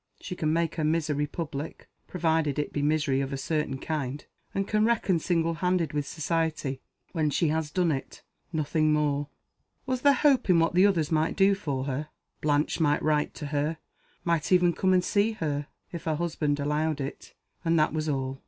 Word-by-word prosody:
She 180 - -6
can 155 -3 0
make 165 0 0
her 160 - 0
misery 150 -2 +1
public 150 -1 -6 0.2
provided 160 -5 0
it 150 - -2
be 145 - -1
misery 145 -2 +1
of 135 0 -3
a 135 - -2
certain 150 -1 -1
kind 145 -1 -4 0.3
and 195 0 -2
can 215 0 +2
reckon 215 -6 +2
single 165 0 +1
handed 175 -2 0
with 145 -1 -1
Society 155 -4 -2 0.3
when 155 -4 +1
she 150 +3 +1
has 160 0 -1
done 175 +1 +1
it. 135 -2 -5 0.3
Nothing 155 -1 +1
more. 145 -1 +1 0.6
Was 255 -2 -1
there 285 0 +6
hope 270 -5 +3
in 180 - +6
what 165 +1 +2
others 180 -5 +3
might 160 0 +1
do 195 0 +5
for 140 -9 -2
her? 140 +2 -3 0.3
Blanche 150 +2 +1
might 150 -2 +2
write 150 -1 +1
to 150 - -6
her 150 +3 0 0.5
might 170 -1 0
even 180 -1 +5
come 190 +2 +1
and 180 -1 +4
see 205 +4 +2
her 145 -7 -2 0.2
if 170 - -7
her 160 -1 +1
husband 150 -3 -1
allowed 150 +1 0
it; 135 0 -6 0.3
and 165 -1 +2
that 155 -1 +3
was 155 -1 -1
all. 135 -1 -2
155 Hz, 190 wpm, -27 LUFS, 145-170 Hz, 0.6 s, there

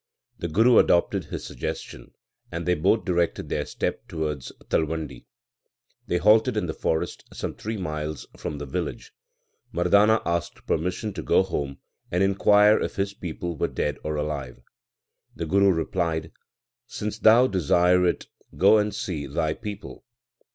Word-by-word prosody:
The 85 - -2
Guru 115 +9 +5
adopted 85 - +2
his - - -6
suggestion, - - -6 0.4
and 85 +1 -4
they 90 - +3
both 95 +7 +2
directed 85 -3 0
their - - -2
steps - - -3
towards 75 -5 -4 0.2
Talwandi. 80 0 -2 0.8
They 90 - +1
halted 105 +5 +4
in - - 0
the - - -3
forest 80 - -2
some - - -4
three 110 +1 -5
miles 75 -5 -4
from 75 - -5
the 70 - -5
village. 65 - -5 0.6
Mardana 100 +6 +4
asked 85 -1 -3
permission 90 +6 -1
to - - -5
go - - +3
home 70 -7 -4 0.3
and 90 +2 +1
inquire 105 +2 +5
if - - -3
his 100 0 -1
people 85 -2 -5
were - - 0
dead 75 -1 -2
or 75 0 -2
alive. 75 -5 -4 0.8
The 85 - -4
Guru 100 +4 +4
replied, 80 -2 -1 0.6
Since 105 +1 -5
thou 115 +3 +6
desire 90 - +3
it, - - -1 0.3
go 100 +6 +6
and 105 -1 -1
see 85 -9 -4
thy 80 +2 -1
people. 105 0 -8
90 Hz, 150 wpm, -25 LUFS, 80-100 Hz, 0.8 s, thou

